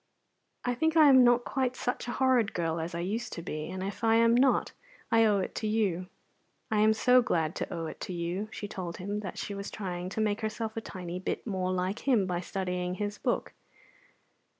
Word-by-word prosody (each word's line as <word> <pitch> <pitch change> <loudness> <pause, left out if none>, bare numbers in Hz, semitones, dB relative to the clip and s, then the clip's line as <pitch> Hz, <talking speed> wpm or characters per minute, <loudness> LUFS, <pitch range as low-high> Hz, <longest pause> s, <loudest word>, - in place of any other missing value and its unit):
I 245 - +1
think 320 +6 +1
I 305 -2 +8
am 260 -2 +8
not 240 0 +4
quite 255 -2 -1
such 245 0 -3
a 240 - -2
horrid 255 -5 +2
girl 165 -1 -1
as 165 +1 -4
I 170 - -2
used 220 +7 -3
to 170 - -6
be; 155 -1 -4
and 185 0 -4
if 195 +3 -5
I 225 0 +4
am 230 0 +5
not, 260 +3 +3 0.4
I 225 0 +5
owe 210 -2 +4
it 190 - -2
to 215 - -1
you. 195 -5 0 0.6
I 215 - +2
am 215 +1 +5
so 250 +3 +5
glad 165 -8 0
to - - -4
owe 165 -1 -3
it 155 - -7
to - - -5
you." 175 +5 -3
She 205 - -5
told 180 -4 -6
him 200 +3 -3
that 200 -3 -6
she 205 - -4
was 200 0 -5
trying 180 -3 -4
to 200 - -5
make 210 0 0
herself 220 0 -3
a 225 - -3
tiny 180 -4 -6
bit 185 - -3
more 185 -4 -1
like 185 +3 -1
him 235 -8 +4
by 180 -1 -1
studying 180 -1 -3
his 205 +1 -4
book. - - -1
205 Hz, 220 wpm, -29 LUFS, 180-230 Hz, 0.6 s, I